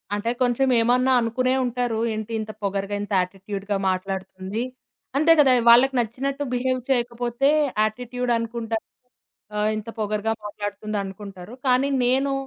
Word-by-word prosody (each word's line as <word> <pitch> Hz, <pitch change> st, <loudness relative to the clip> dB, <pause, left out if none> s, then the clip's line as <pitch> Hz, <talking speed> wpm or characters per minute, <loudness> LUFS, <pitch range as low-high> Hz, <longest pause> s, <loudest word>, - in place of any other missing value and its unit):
అంటే 205 Hz, +3 st, -2 dB
కొంచమేమన్నా 250 Hz, 0 st, +3 dB
అనుకునే 255 Hz, +3 st, +1 dB
ఉంటారు. 245 Hz, -2 st, -1 dB, 0.2 s
ఏంటింత 220 Hz, 0 st, -4 dB
పొగరుగా 200 Hz, 0 st, -1 dB
ఇంత 205 Hz, -, -7 dB
యాటిట్యూడ్‌గా 195 Hz, +2 st, -4 dB
మాట్లాడుతుంది. 190 Hz, +2 st, -3 dB, 0.5 s
అంతే 310 Hz, +3 st, +5 dB
కదా! 275 Hz, -3 st, +6 dB, 0.2 s
వాళ్ళకి 250 Hz, +3 st, +7 dB
నచ్చినట్టు 265 Hz, +5 st, -2 dB
బిహేవ్ 255 Hz, +1 st, 0 dB
చేయకపోతే 240 Hz, +1 st, +1 dB, 0.3 s
యాటిట్యూడ్ 245 Hz, +3 st, -2 dB
అనుకుంటా. 230 Hz, 0 st, -3 dB, 0.8 s
ఆహ్, 210 Hz, 0 st, +1 dB
ఇంత 215 Hz, +1 st, -6 dB
పొగరుగా 215 Hz, +1 st, 0 dB
మాట్లాడుతుందనుకుంటారు. 205 Hz, -1 st, -5 dB
కానీ 255 Hz, +2 st, +3 dB, 0.2 s
నేను 270 Hz, +3 st, +2 dB
230 Hz, 110 wpm, -24 LUFS, 205-250 Hz, 0.8 s, వాళ్ళకి